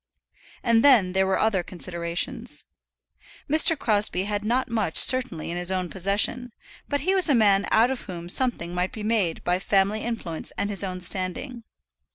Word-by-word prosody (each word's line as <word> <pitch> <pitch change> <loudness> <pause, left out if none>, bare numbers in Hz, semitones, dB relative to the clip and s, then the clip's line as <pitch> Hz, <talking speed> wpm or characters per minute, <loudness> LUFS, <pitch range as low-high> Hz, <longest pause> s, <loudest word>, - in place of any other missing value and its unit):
And 230 -2 +1
then 240 -10 +4
there 190 +1 0
were 190 - -1
other 215 -4 0
considerations. 170 -1 -3 0.8
Mr. 310 +2 +5
Crosbie 205 -6 +1
had 205 0 -4
not 245 +4 -2
much 215 -8 -2
certainly 250 - +6
in 175 - -5
his 175 +1 -1
own 185 -2 -3
possession, 205 +6 0 0.4
but 285 -1 -2
he 370 +6 -1
was 375 -4 +4
a 285 - +3
man 200 -3 +2
out 235 +4 +2
of 265 - -7
whom 175 -3 -9
something 175 -5 -1
might 180 +1 -3
be 215 - -8
made 210 -7 -2
by 180 +1 -1
family 200 +2 -1
influence 210 -9 -5
and 205 - -3
his 200 -1 +1
own 185 -1 -6
standing. 195 +8 -3
205 Hz, 175 wpm, -23 LUFS, 180-235 Hz, 0.8 s, certainly